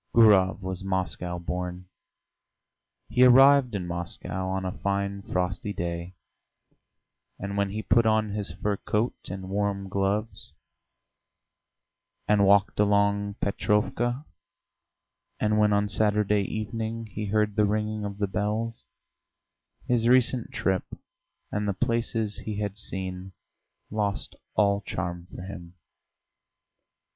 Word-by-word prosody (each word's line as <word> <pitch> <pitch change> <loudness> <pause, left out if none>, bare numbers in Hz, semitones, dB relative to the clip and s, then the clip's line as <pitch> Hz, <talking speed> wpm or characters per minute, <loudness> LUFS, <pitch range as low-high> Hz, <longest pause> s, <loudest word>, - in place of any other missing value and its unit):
Gurov 100 -4 +5
was 95 0 -4
Moscow 90 -2 -2
born; 90 +1 -4 1.2
he 125 +3 +3
arrived 130 -1 +7
in 95 -3 -2
Moscow 85 +2 -2
on 95 0 -2
a 90 - -1
fine 100 0 -1
frosty 95 +2 -2
day, 85 0 -4 1.2
and 100 +1 -5
when 100 0 +1
he 110 +2 -4
put 115 +1 +3
on 110 -1 +2
his 100 -3 -2
fur 100 +3 -2
coat 110 +5 0 0.2
and 95 0 -6
warm 100 -1 -1
gloves, 100 +3 -2 1.7
and 100 -2 +4
walked 100 0 +4
along 100 0 +2
Petrovka, 120 +6 0 1.1
and 105 0 +2
when 105 0 +4
on 100 0 +2
Saturday 105 -1 +2
evening 110 +2 -4
he 105 -1 -5
heard 105 0 +1
the 105 -1 +4
ringing 105 +1 -1
of 100 -1 -5
the 100 - +1
bells, 105 +3 -2 1.0
his 120 -2 +2
recent 125 -1 +3
trip 95 -1 -1 0.5
and 105 0 -1
the 100 - +1
places 115 -1 -1
he 110 - -5
had 100 -2 -2
seen 95 -2 -5 0.6
lost 105 -2 -2 0.2
all 100 -1 +3
charm 85 -2 -4
for 90 - -9
him. 90 -2 -9
100 Hz, 120 wpm, -27 LUFS, 95-110 Hz, 1.7 s, arrived